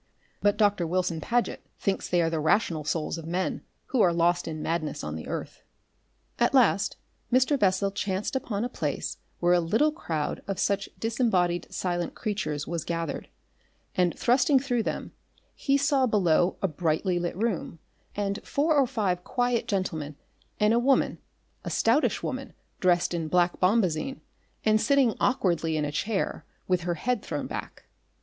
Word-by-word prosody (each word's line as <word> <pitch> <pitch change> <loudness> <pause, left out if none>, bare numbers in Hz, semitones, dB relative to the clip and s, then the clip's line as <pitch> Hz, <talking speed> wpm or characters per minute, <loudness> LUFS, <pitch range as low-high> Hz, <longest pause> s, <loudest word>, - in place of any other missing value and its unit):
But 205 0 +3
Doctor 205 -5 +2
Wilson 175 -2 0
Paget 240 0 0
thinks 195 -1 -1
they 175 -1 +3
are 165 - +1
the 160 - 0
rational 160 0 +2
souls 155 +2 -2
of 160 - -8
men 180 +2 -1 0.3
who 255 -3 +2
are 175 - +5
lost 170 +1 +2
in 155 -1 -4
madness 160 -3 -2
on 75 0 -4
the 80 - -7
earth. - - -5 0.8
At - - +3
last - - +3 0.3
Mr. 255 +4 +4
Bessel 195 -1 +2
chanced 195 +3 -2
upon 225 -4 -1
a - - 0
place 250 - -3 0.2
where 175 0 +3
a 180 - +5
little 220 - +2
crowd 160 - -3
of 195 -2 -2
such 200 0 0
disembodied 190 -7 +1
silent 175 -2 -2
creatures 195 -9 -2
was 170 -2 -3
gathered, 165 -3 -3 0.6
and 180 -2 +1
thrusting 255 +3 +4
through 250 -3 0
them - - -4 0.4
he 275 0 +1
saw 275 -2 +2
below 180 -5 +2
a - - +4
brightly 175 +2 0
lit 175 0 -3
room, 210 -6 -2 0.4
and 200 0 -1
four 305 +3 +1
or 275 -3 +4
five 195 -8 -1
quiet 245 +1 0
gentlemen 160 -7 -2 0.4
and 210 +1 +4
a 235 - +4
woman, 265 +2 +2 0.4
a - - -4
stoutish 235 +7 +2
woman - - -4 0.3
dressed 175 -1 +2
in 165 -2 -2
black 175 +2 +2
bombazine 185 - +1 0.5
and 215 0 +4
sitting 265 -1 +3
awkwardly 170 - +1
in 150 - 0
a 145 - -3
chair 200 +7 -2 0.2
with 180 -1 +2
her 175 - +1
head 245 +6 -1
thrown - - -4
back. - - -6
185 Hz, 165 wpm, -27 LUFS, 170-230 Hz, 0.8 s, are